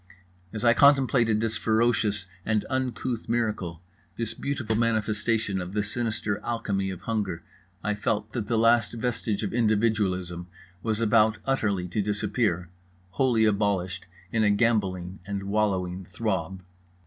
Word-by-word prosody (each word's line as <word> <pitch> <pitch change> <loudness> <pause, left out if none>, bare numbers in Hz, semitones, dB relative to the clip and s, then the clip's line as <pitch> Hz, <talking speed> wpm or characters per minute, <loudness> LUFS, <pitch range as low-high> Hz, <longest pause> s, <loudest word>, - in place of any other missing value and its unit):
As 110 +1 -4
I 120 - +7
contemplated 130 -5 +4
this 115 -1 0
ferocious 110 -3 +1 0.2
and 110 0 0
uncouth 130 -3 -2
miracle, 105 -8 -1 0.3
this 115 -1 -2
beautiful 120 -3 -2
manifestation 110 -2 0
of 90 +1 -6
the 105 0 +1
sinister 110 -1 -2
alchemy 100 -5 -1
of 95 -2 -6
hunger, 95 -5 -2 0.4
I 105 - 0
felt 105 +1 -2
that 115 -5 -3
the 115 - +1
last 115 0 +4
vestige 115 -3 -2
of 100 - -3
individualism 105 -6 +1 0.3
was 110 0 -1
about 110 0 +4
utterly 100 -9 0
to 105 +4 0
disappear, 100 -3 -1 0.4
wholly 120 0 +3
abolished 100 -4 0 0.2
in 110 -2 +2
a 105 - +4
gambolling 100 -4 +1
and 100 -1 -3
wallowing 95 -3 -1
throb. 95 -1 -3
105 Hz, 135 wpm, -27 LUFS, 95-115 Hz, 0.4 s, I